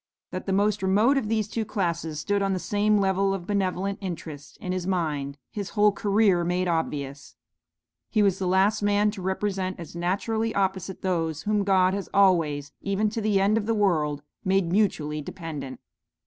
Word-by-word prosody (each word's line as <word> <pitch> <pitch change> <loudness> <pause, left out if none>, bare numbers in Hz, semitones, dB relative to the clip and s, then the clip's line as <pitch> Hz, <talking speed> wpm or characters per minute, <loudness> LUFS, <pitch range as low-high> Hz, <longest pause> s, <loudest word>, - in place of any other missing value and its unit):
That - - -5
the - - 0
most 205 +1 +2
remote 205 +8 +3
of 250 -6 -1
these 220 -2 0
two 225 +1 -2
classes 170 -7 -2
stood 200 +6 0
on 195 -1 +1
the - - 0
same 210 +3 +1
level 195 0 +2
of 180 -3 -7
benevolent 195 0 -1
interest 160 -6 -7
in 180 - -5
his 185 -1 -2
mind, 150 -6 -1
his 200 -2 -4
whole 210 0 +6
career 200 -3 +2
made 180 +1 0
obvious; 145 -4 -3 0.7
he 215 -2 +2
was 195 -2 +2
the 185 - -1
last 195 +4 +3
man 205 +1 +2
to 205 -2 -8
represent 190 0 -2
as 170 0 -9
naturally 220 +6 -1
opposite 190 -1 -1
those 165 -4 -1
whom 210 -1 +1
God 190 -1 +3
has 200 -1 -4
always, 165 -7 +3
even 200 +2 0
to 225 - -3
the 210 -2 +2
end 205 +3 +3
of 210 - -5
the 225 - +1
world, 155 -8 +1 0.2
made 190 -2 +1
mutually 155 -7 +1
dependent. 145 -6 -7
190 Hz, 180 wpm, -26 LUFS, 170-205 Hz, 0.7 s, whole